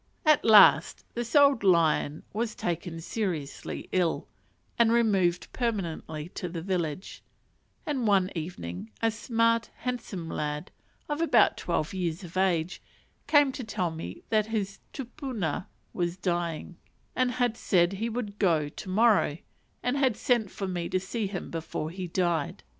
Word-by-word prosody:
At 305 -1 +5
last 215 -3 +6
this 235 +1 -4
old 280 -5 +6
lion 165 -5 +3
was 220 +1 -2
taken 170 -1 -3
seriously 170 -7 -4
ill, 180 -3 0 0.5
and 230 -1 +5
removed 195 -7 +2
permanently 170 - -3
to 180 - -5
the 165 -1 -5
village; 180 -2 -3 0.6
and 265 -6 -1
one 195 -2 +3
evening 110 - -6
a 225 - +4
smart, 230 0 +1
handsome 220 -9 -4
lad, 150 +2 -3 0.4
of 295 +1 -2
about 330 - +4
twelve 170 0 -2
years 180 -1 -2
of 175 0 -10
age, 180 -2 +1 0.5
came 290 -3 +5
to 260 - -6
tell 180 -6 -2
me 160 0 -7
that 215 -1 +2
his 205 -3 -3
tupuna 250 - -4 0.3
was 175 0 -1
dying, 175 -2 -2 0.4
and 255 -1 +1
had 245 -1 +1
said 175 -5 +2
he 220 +4 -2
would 215 -3 -5
"go" 160 -7 +2
to 185 - -9
morrow, 210 -6 +3 0.5
and 250 +3 0
had 260 -6 +2
sent 235 -5 +1
for 195 - -5
me 175 -2 -3
to 185 - +1
see 205 +3 -3
him 190 -2 -6
before 160 -1 -4
he 185 0 -5
died. 175 -1 -1
190 Hz, 145 wpm, -28 LUFS, 170-230 Hz, 0.6 s, last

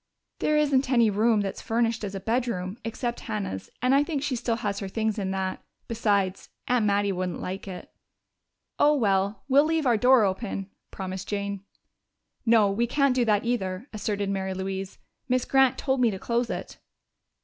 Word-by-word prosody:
"There 305 - +2
isn't 275 -3 +2
any 235 -4 +4
room 215 +1 +3
that's 195 -1 -4
furnished 230 -1 0
as 200 -1 -4
a - - -3
bedroom, 225 -2 -2
except 235 +1 -3
Hannah's, 205 - -4
and 255 +1 +4
I 280 +1 +5
think 290 -3 -3
she 290 -3 -1
still 235 -1 -1
has 205 -3 -2
her 195 - -4
things 220 +2 -1
in 190 -2 -2
that. 190 0 -2 0.3
Besides, 200 -4 0 0.2
Aunt 245 -4 +2
Mattie 200 0 +2
wouldn't 180 -2 -3
like 190 +2 -5
it." 185 -2 -8 0.9
"Oh, 295 +1 +5
well, 200 -4 +1
we'll 280 +1 +5
leave 320 -1 0
our 240 -3 +4
door 250 +1 +5
open," 195 0 -3 0.2
promised 190 -1 -6
Jane. 200 -1 -3 0.8
"No, 220 -3 +5
we 235 +4 0
can't 275 +1 +2
do 250 -1 +2
that 210 -1 +2
either," 205 -2 -2
asserted 205 -2 -2
Mary 190 -1 -2
Louise. 190 0 -4 0.3
"Miss 255 0 +2
Grant 265 -1 +4
told 265 -2 0
me 240 - +5
to 195 - -4
close 235 +4 -1
it." - - -6
220 Hz, 180 wpm, -26 LUFS, 195-245 Hz, 0.9 s, I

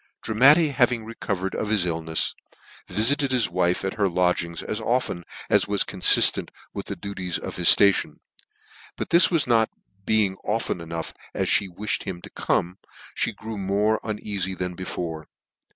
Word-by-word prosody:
Dramatti 140 +9 +5
having 120 -4 +1
recovered 100 -4 -4
of 105 - -3
his 105 -5 +1
illnefs, 80 -2 -2 0.6
viftt 115 +7 +2
ted 140 -2 -1
his 125 -8 +1
wife 90 +1 0
at 95 - -2
her 100 -2 +2
lodgings 90 -2 -1
as 110 +1 -4
often 115 -7 -1 0.2
as. - - +2
was 100 -1 +2
corw - - -9
fiftent - - +5 0.2
with - - -6
the - - -4
duties 95 -3 -4
of - - -7
his 85 -2 +5
Ration; 100 -1 +2 0.8
but - - -5
this 170 +1 +6 0.2
not 115 -3 +2 0.3
being 100 -2 +1
fo - - -26
often 110 -5 -2
as 85 - -9 0.7
me 100 - -7
wiihed 100 +4 -2
him 95 -3 -6
to - - -11
come, 90 +3 -1 0.4
fhe - - -1
grew 110 -1 -7
more 105 +3 +1
uneafy 100 -3 -4
than 90 0 -3
before. 85 -3 -6
100 Hz, 165 wpm, -24 LUFS, 90-110 Hz, 0.8 s, this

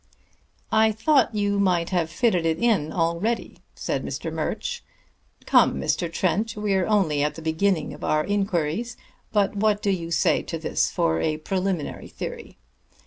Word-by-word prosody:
"I 220 0 +4
thought 235 +1 +2
you 205 -1 +1
might 180 -3 +1
have 170 -3 +1
fitted 180 -1 +1
it 160 -1 +1
in 190 -7 +1
already," 170 +8 -1 0.2
said - - -2
Mr. - - -4
Murch. 485 - -3 0.6
"Come, - - +4
Mr. 170 -2 -1
Trent, 205 +6 0
we're 195 -3 +1
only 185 -9 +2
at 150 0 0
the 165 - -8
beginning 160 +2 0
of - - -11
our 155 0 +1
inquiries, 200 +1 -1 0.3
but 205 -1 +1
what 205 0 +2
do 205 - 0
you 170 -3 -3
say 170 - +2
to - - -5
this - - 0
for 80 0 0
a 155 -1 0
preliminary 185 0 -3
theory? - - -7
190 Hz, 155 wpm, -24 LUFS, 165-210 Hz, 0.6 s, I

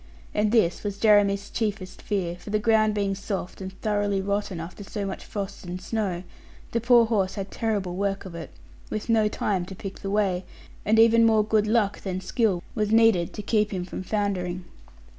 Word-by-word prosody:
And 210 0 +1
this 215 -7 +2
was 205 -2 -3
Jeremy's 205 -2 +3
chiefest 205 -4 -3
fear, 185 -5 -2
for 180 - -11
the 215 - +2
ground 215 0 +3
being 200 -1 0
soft 195 -1 -5
and 190 0 -5
thoroughly 205 -2 +1
rotten, 200 -2 -2
after 170 +5 -7
so 200 +1 -4
much 195 - -5
frost 200 -1 -5
and 180 0 -5
snow, 190 -4 -2 0.5
the 230 - 0
poor 240 0 +6
horse 200 -5 0
had 195 -1 -5
terrible 205 -6 -1
work 195 +1 -1
of 185 - -8
it, 170 -8 -7 0.4
with 215 +2 -4
no 220 -2 +4
time 200 -3 -1
to 190 - -8
pick 195 +1 -7
the 195 - -4
way; 195 -3 +1 0.4
and 220 +2 +3
even 230 0 +6
more 220 -2 +5
good 215 -1 +2
luck 215 -2 +1
than 185 -2 -3
skill 190 -1 0
was 210 -2 0
needed 225 -7 +4
to 210 - -6
keep 210 0 +2
him 185 -3 -3
from 180 - -6
foundering. 185 -3 -2
205 Hz, 195 wpm, -26 LUFS, 190-215 Hz, 0.5 s, poor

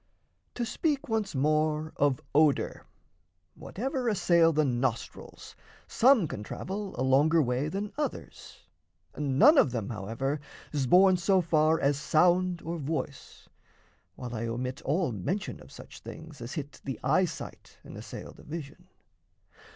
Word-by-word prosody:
To 240 - -2
speak 290 +4 -1
once 220 -6 -1
more 155 +2 +1
of 140 -3 +1
odour; 150 -1 +2 0.7
Whatever 255 +3 -4
assail 170 -5 +4
the 155 -1 +2
nostrils, 125 -2 -3 0.3
some 240 - +4
can 105 - -6
travel 195 - -6
A - - +1
longer 145 +5 +4
way 130 0 0
than 200 +4 -4
others. 295 - -6 0.5
None 150 - +5
of - - +4
them, 115 -3 -4
However, 115 +8 -3 0.3
's 140 -3 0
borne 185 +4 +6
so 190 +2 +3
far 160 -2 +2
as 140 0 +1
sound 175 +3 +2
or 165 +1 -4
voice 145 -1 -5 0.7
While 125 -2 -7
I 115 0 -3
omit 125 +3 -4
all 155 0 0
mention 175 - -3
of - - -15
such - - -12
things 155 -4 -11
As 120 +3 -6
hit 145 -2 -7
the 135 -2 -5
eyesight 175 +4 -1
and - - -11
assail - - -8
the - - -16
vision. 150 -2 -8
155 Hz, 140 wpm, -29 LUFS, 135-185 Hz, 0.7 s, borne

